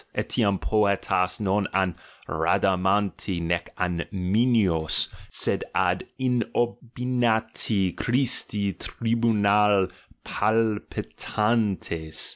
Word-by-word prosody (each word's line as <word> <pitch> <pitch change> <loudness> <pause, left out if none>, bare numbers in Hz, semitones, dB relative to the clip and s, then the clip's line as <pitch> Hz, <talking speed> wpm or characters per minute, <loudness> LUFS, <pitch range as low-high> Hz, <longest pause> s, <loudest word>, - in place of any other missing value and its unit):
Etiam 100 -1 +1
poet 105 -3 0
as 90 0 +1
non 100 0 0
ad 95 -2 +1 0.3
Rhadamanti 95 +4 +1
nee 85 +1 0 0.2
ad 90 -2 -2
Minois, 95 -5 +2 0.2
sed - - -1
ad - - +1
inopinati 120 -4 0
Christi 115 -5 +2
tribunal 105 -4 +2 0.4
palpitantes! 105 -5 -1
105 Hz, 75 wpm, -25 LUFS, 90-115 Hz, 0.4 s, Minois